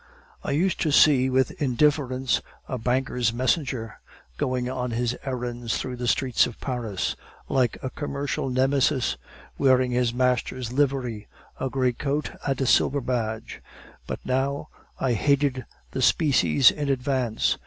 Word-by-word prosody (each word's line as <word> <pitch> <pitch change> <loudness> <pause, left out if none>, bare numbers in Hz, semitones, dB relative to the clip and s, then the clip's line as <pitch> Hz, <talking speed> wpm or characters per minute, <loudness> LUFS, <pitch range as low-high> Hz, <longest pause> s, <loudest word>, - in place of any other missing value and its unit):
"I - - -4
used 170 +6 +1
to 155 - +1
see 135 -3 +5
with 130 0 +2
indifference 130 -1 +1 0.3
a 130 - -3
banker's 125 -1 0
messenger 125 -2 -1 0.4
going 125 -1 -1
on 125 -1 -3
his 120 +1 -1
errands 120 -3 -3
through 125 -1 -4
the 120 0 -3
streets 125 0 +2
of 120 - -10
Paris, 120 -7 -3 0.3
like 125 -4 +1
a 130 - -3
commercial 140 -2 -3
Nemesis, 130 +1 +2 0.4
wearing 130 -1 +4
his 125 -1 +1
master's 125 -1 -1
livery 130 -6 0 0.3
a 135 - -1
gray 130 -1 +1
coat 145 +4 -2 0.2
and 135 -2 0
a 135 - +1
silver 140 +3 +3
badge; 115 -4 -3 0.5
but - - -4
now 135 +2 -1 0.3
I 130 -2 +1
hated 135 +1 +1 0.3
the - - -3
species 130 - +4
in 145 -2 -3
advance. 130 -4 0
130 Hz, 140 wpm, -25 LUFS, 125-135 Hz, 0.5 s, see